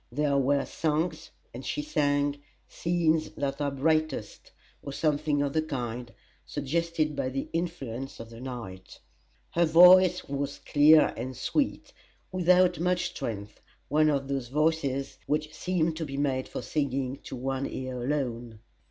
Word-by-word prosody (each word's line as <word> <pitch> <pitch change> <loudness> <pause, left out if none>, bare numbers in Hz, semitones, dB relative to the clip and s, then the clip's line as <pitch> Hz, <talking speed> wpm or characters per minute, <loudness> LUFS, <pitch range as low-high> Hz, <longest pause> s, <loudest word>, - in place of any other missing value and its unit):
There 145 +2 +1
were 140 +1 +2
songs, 160 +1 -2 0.2
and 125 +3 -8
she 295 - -3
sang 145 - 0 0.3
"Scenes 165 -2 +1
that 140 0 -2
are 145 - +1
brightest," 150 -4 -1 0.3
or 140 - -7
something 150 -1 +1
of 140 -1 -2
the 155 - +2
kind, 125 -5 -4 0.3
suggested 155 +1 -1
by 130 - -1
the 135 +1 -3
influences 135 -7 -4
of 115 0 -9
the 115 +1 -10
night. 110 -8 -8 0.5
Her 170 0 +3
voice 180 +2 +7
was 140 0 -3
clear 150 +1 +5
and 125 +2 -5
sweet, 280 - -1 0.4
without 180 -1 +4
much 180 +1 +1
strength 105 -2 -6 0.3
one 155 +1 +4
of 140 -2 0
those 135 -3 -2
voices 140 -1 0
which 155 +1 -1
seem 165 -1 0
to 160 +1 -4
be 140 -2 -6
made 135 -2 0
for - - -6
singing 135 -2 -2
to - - -6
one 135 +2 -2
ear 130 -1 -5
alone. 120 -5 -2
145 Hz, 145 wpm, -28 LUFS, 130-160 Hz, 0.5 s, voice